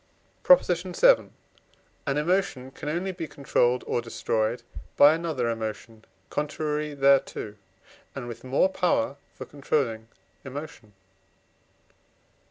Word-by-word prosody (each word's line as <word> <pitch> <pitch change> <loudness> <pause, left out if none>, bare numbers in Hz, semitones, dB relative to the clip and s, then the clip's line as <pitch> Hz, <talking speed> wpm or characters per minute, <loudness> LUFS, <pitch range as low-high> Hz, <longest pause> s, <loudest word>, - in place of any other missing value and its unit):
PROP. - - +6
VII. 185 - +3 0.8
An 140 +1 0
emotion 150 -5 0
can 145 +2 -6
only 175 +5 -2
be 170 -3 -6
controlled 125 -3 +1
or 120 - -1
destroyed 115 0 -2 0.3
by 145 +2 +8
another 160 -7 -2
emotion 110 -1 -5 0.3
contrary 150 0 -2
thereto, 135 -6 +2 0.6
and 130 -3 -6
with 120 - -8
more 130 +7 +2
power 175 -8 0 0.2
for - - -8
controlling 135 -6 -2 0.4
emotion. 135 -6 -9
140 Hz, 105 wpm, -26 LUFS, 120-160 Hz, 0.8 s, by